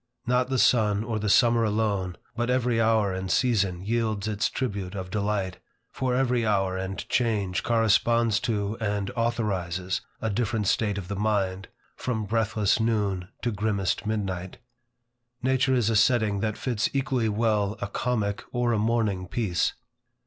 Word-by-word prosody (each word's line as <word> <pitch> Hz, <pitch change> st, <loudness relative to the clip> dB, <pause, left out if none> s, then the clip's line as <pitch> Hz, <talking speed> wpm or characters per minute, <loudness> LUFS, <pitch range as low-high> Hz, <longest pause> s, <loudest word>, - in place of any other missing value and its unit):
Not 125 Hz, +1 st, +1 dB
the 130 Hz, -, 0 dB
sun 105 Hz, -4 st, +3 dB
or 110 Hz, -1 st, -2 dB
the 105 Hz, 0 st, -1 dB
summer 115 Hz, +1 st, +5 dB
alone, 105 Hz, -4 st, 0 dB, 0.2 s
but 120 Hz, +1 st, -1 dB
every 125 Hz, -2 st, +2 dB
hour 110 Hz, -3 st, +2 dB
and 95 Hz, 0 st, -4 dB
season 100 Hz, -7 st, +1 dB
yields 110 Hz, -2 st, -1 dB
its 105 Hz, 0 st, 0 dB
tribute 100 Hz, -7 st, -3 dB
of 95 Hz, -2 st, -5 dB
delight; 100 Hz, -2 st, -1 dB, 0.3 s
for 130 Hz, -1 st, -1 dB
every 125 Hz, -2 st, +1 dB
hour 95 Hz, -3 st, +1 dB
and 95 Hz, +1 st, -4 dB
change 105 Hz, -6 st, 0 dB
corresponds 115 Hz, 0 st, +3 dB
to 105 Hz, -1 st, -2 dB
and 105 Hz, -2 st, -1 dB
authorizes 95 Hz, -6 st, -1 dB, 0.2 s
a 110 Hz, -, -1 dB
different 110 Hz, 0 st, -1 dB
state 105 Hz, +1 st, +1 dB
of 95 Hz, -3 st, -5 dB
the 100 Hz, -, -3 dB
mind, 95 Hz, -2 st, 0 dB, 0.3 s
from 110 Hz, -4 st, -2 dB
breathless 110 Hz, 0 st, +1 dB
noon 105 Hz, -5 st, 0 dB, 0.2 s
to 120 Hz, -, +1 dB
grimmest 105 Hz, -1 st, -1 dB
midnight. 95 Hz, -4 st, -3 dB, 0.9 s
Nature 130 Hz, 0 st, +2 dB
is 120 Hz, -4 st, +2 dB
a 115 Hz, -, +2 dB
setting 110 Hz, -2 st, +3 dB
that 110 Hz, 0 st, -2 dB
fits 120 Hz, -4 st, -1 dB
equally 130 Hz, -5 st, 0 dB
well 105 Hz, -1 st, +1 dB
a -, -, -2 dB
comic 105 Hz, -1 st, -1 dB
or 120 Hz, -1 st, +1 dB
a 110 Hz, -, +1 dB
mourning 105 Hz, -4 st, 0 dB
piece. 95 Hz, -4 st, 0 dB
110 Hz, 155 wpm, -26 LUFS, 100-115 Hz, 0.9 s, summer